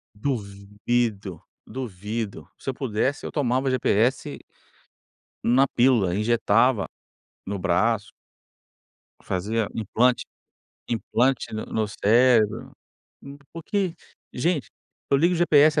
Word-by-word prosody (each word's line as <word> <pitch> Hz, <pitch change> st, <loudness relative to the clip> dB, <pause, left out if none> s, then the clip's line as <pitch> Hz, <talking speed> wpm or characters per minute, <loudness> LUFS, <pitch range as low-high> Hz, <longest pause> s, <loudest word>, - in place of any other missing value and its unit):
Duvido, 105 Hz, -, -2 dB, 0.2 s
duvido. 110 Hz, -3 st, -5 dB
Se -, -, -5 dB
eu -, -, -1 dB
pudesse 130 Hz, +2 st, -2 dB
eu -, -, -5 dB
tomava 130 Hz, -2 st, 0 dB
GPS 125 Hz, -1 st, +1 dB, 1.1 s
na 130 Hz, +4 st, +4 dB
pílula, 120 Hz, -8 st, +3 dB
Injetava 115 Hz, +1 st, +2 dB, 0.6 s
no 100 Hz, -, -3 dB
braço 105 Hz, +5 st, +1 dB, 1.1 s
fazia 105 Hz, +4 st, -1 dB
implante, 120 Hz, +3 st, +1 dB, 0.6 s
implante 120 Hz, +2 st, 0 dB
no 110 Hz, -, -4 dB
no 110 Hz, -1 st, -1 dB
cérebro. 110 Hz, +1 st, +3 dB, 0.5 s
M 140 Hz, +1 st, -10 dB, 0.2 s
porque, 180 Hz, +1 st, -2 dB, 0.4 s
gente, 145 Hz, -, -1 dB, 0.4 s
eu 140 Hz, -, +5 dB
ligo 170 Hz, +6 st, +3 dB
o -, -, -1 dB
GPS 155 Hz, -2 st, +5 dB
115 Hz, 100 wpm, -24 LUFS, 105-135 Hz, 1.1 s, eu